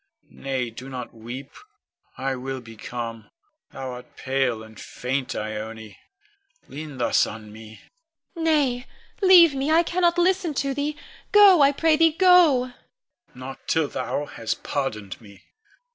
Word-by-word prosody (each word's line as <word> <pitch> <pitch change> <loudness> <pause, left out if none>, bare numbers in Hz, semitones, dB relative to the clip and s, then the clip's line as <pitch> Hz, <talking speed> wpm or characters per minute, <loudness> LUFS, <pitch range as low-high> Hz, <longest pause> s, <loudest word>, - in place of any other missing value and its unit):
Nay, 130 -3 -3
do 125 +4 -10
not 125 -2 -7
weep. 120 +5 -9 0.7
I 135 0 -2
will 130 +1 -5
be 115 -2 -13
calm. 115 0 -7 0.4
Thou 130 -1 -6
art 125 0 -11
pale 130 -4 -1
and 110 0 -14
faint, 130 +1 -4
Ione, 110 0 -6 0.7
lean 150 -1 -8
thus 120 - +2
on 105 0 -9
me. 110 0 -13 0.5
Ione. 330 - -5
Nay, 280 -6 +1 0.3
leave 355 -5 +7
me; 275 +2 -2
I 325 +2 +5
cannot 345 0 +1
listen 355 -3 +1
to 275 0 -1
thee. 290 +2 -3 0.3
Go, 400 -5 +7
I 280 0 +6
pray 315 +2 +2
thee, 325 0 +4
go! 330 -8 +5
Con. 245 - -25
Not 135 +1 -9
till 160 -2 +1
thou 145 - -3
hast 115 -5 -5
pardoned 105 -9 -4
me. 100 -3 -16
135 Hz, 145 wpm, -24 LUFS, -, 0.7 s, leave